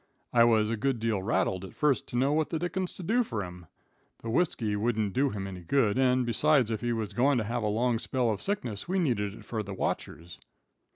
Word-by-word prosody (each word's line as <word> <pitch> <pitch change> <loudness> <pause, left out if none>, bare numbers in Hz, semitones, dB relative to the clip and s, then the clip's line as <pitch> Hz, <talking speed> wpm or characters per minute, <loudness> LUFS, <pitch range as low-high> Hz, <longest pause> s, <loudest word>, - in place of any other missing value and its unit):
I 115 -1 +6
was 110 -2 +3
a 115 - -1
good 135 +3 0
deal 110 -3 0
rattled 95 -2 0
at 95 - -10
first 145 -4 +1
to - - -7
know 135 +3 +2
what 155 0 +1
the 165 - -1
dickens 175 +2 -2
to 185 - -8
do 235 +8 +2
fur 110 - -3
him. 90 -1 -10 0.6
The 115 - -3
whiskey 115 -8 0
wouldn't 110 -2 0
do 135 +2 +2
him 100 -4 -4
any 95 -2 -6
good, 110 +5 +2
and, 130 -1 +3
besides, 130 0 +3
if 110 - -2
he 120 0 -1
was 110 -3 -3
goin' 130 +5 +3
to 115 - +1
have 120 +3 -2
a 105 - 0
long 115 +2 +1
spell 125 -1 0
of 105 - -3
sickness 130 - -3
we 190 +2 0
needed 110 - 0
it - - -13
for 110 -2 -3
the 100 -1 -6
watchers. 85 -2 -4
115 Hz, 235 wpm, -29 LUFS, 105-135 Hz, 0.6 s, I